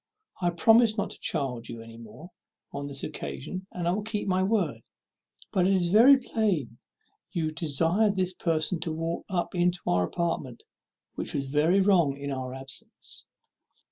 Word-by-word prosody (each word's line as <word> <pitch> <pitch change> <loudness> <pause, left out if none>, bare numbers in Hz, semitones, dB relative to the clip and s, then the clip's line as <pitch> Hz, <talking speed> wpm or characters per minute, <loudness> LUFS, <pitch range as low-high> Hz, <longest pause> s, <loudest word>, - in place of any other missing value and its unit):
I 175 - +3
promised 225 +5 +5
not 200 - -1
to - - -9
chide 130 -7 -2
you 115 - -6
any 115 0 -12
more 115 - -12 0.4
on 140 0 -5
this 140 -1 -5
occasion, 185 +5 -6
and 175 -1 -3
I - - +3
will 200 +4 -1
keep 210 -1 -3
my 185 -1 +2
word; 185 - 0 0.7
but 185 -1 +3
it 195 - +3
is 180 -2 +2
very 240 +8 +8
plain 195 - -1 0.5
you 160 -2 -1
desired 165 +7 +1
this 185 -1 0
person 165 -1 0
to 165 0 -3
walk 165 +1 -3
up 180 -3 -1
into 180 0 +2
our 90 0 +2
apartment, 145 - -3 0.5
which - - -5
was 135 -1 -2
very 160 +7 +4
wrong 175 -8 +3
in 140 0 -5
our 130 -1 -4
absence." 135 +1 -9
170 Hz, 170 wpm, -28 LUFS, 140-190 Hz, 0.7 s, very